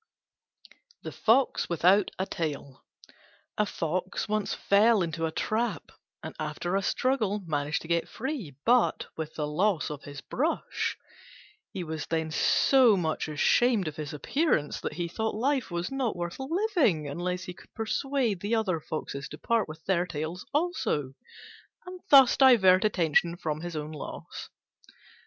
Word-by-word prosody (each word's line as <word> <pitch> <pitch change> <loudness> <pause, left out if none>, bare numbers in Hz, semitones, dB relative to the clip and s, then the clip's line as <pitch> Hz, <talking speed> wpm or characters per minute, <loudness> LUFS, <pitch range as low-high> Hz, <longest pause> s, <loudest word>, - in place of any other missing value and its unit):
THE - - -5
FOX 245 +4 +2
WITHOUT 180 +4 +4
A 190 - -1
TAIL 145 -6 -5 0.7
A 210 - +1
fox 185 +4 -3
once 215 -1 -1
fell 210 0 +4
into 165 0 -2
a - - -4
trap, 225 +8 -2 0.3
and - - -6
after 155 +4 -3
a 195 - +2
struggle 215 -2 0
managed 150 -1 -1
to - - -10
get 170 0 0
free, 240 - -5
but 245 +1 +3
with 160 -1 -6
the 150 - -2
loss 170 +3 0
of 145 -1 -7
his 145 -1 -8
brush. 305 +6 -2 0.7
He 190 -3 -4
was 160 -1 -5
then 160 -1 -1
so 245 - +4
much 160 -3 -1
ashamed 200 - +2
of 155 - -6
his 150 -2 -5
appearance 155 - 0
that - - -4
he 175 -1 -3
thought 220 +6 -3
life 265 +3 0
was 175 +3 -3
not 265 -4 -1
worth 175 +3 -5
living 295 - +1
unless 180 +5 -3
he 180 - -7
could - - -18
persuade 235 -1 -1
the 205 +5 -1
other 190 -7 0
Foxes 140 -3 -5
to - - -9
part 230 -7 0
with 155 0 -10
their 180 -2 +1
tails 165 +2 -5
also, 295 - -1 0.7
and 365 0 -8
thus 270 -3 +8
divert 195 -9 +6
attention 170 -4 +2
from 155 -2 -3
his 175 -1 -6
own 150 0 -4
loss. 150 - -8
180 Hz, 155 wpm, -28 LUFS, 160-230 Hz, 0.7 s, thus